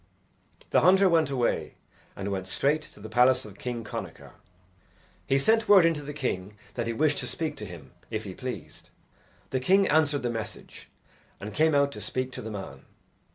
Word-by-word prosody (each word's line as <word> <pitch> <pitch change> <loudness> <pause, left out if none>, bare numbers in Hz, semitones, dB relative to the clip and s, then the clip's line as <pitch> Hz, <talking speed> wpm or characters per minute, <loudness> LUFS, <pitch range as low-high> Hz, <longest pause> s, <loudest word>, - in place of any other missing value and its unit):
The - - +5
hunter 190 +3 +6
went 165 -4 +3
away, 125 -4 -1 0.4
and 100 +1 -4
went 95 -1 -3
straight 145 +9 +1
to - - -16
the 105 - -8
palace 125 +3 +4
of 100 -2 -12
King 120 -2 -4
Connachar. 105 - -7 1.0
He 135 - +3
sent 220 +10 +2
word 195 -4 +8
in 165 - +4
to 150 - -6
the 145 0 -6
king 105 -8 -3 0.2
that 120 -1 -3
he - - 0
wished 150 +4 +1
to 125 - -3
speak 150 +5 -3
to 105 - -6
him 80 -7 -11 0.2
if 110 0 -3
he 95 -3 -7
pleased. 125 +5 -7 0.6
The 130 - +1
king 190 +9 +4
answered 145 -3 +2
the 120 - 0
message 115 -2 -7 0.5
and 105 +1 -7
came 155 +4 +3
out 140 0 +3
to - - -8
speak 130 0 -2
to 130 - -7
the 110 - -6
man. 100 -3 -8
130 Hz, 195 wpm, -27 LUFS, 110-155 Hz, 1.0 s, word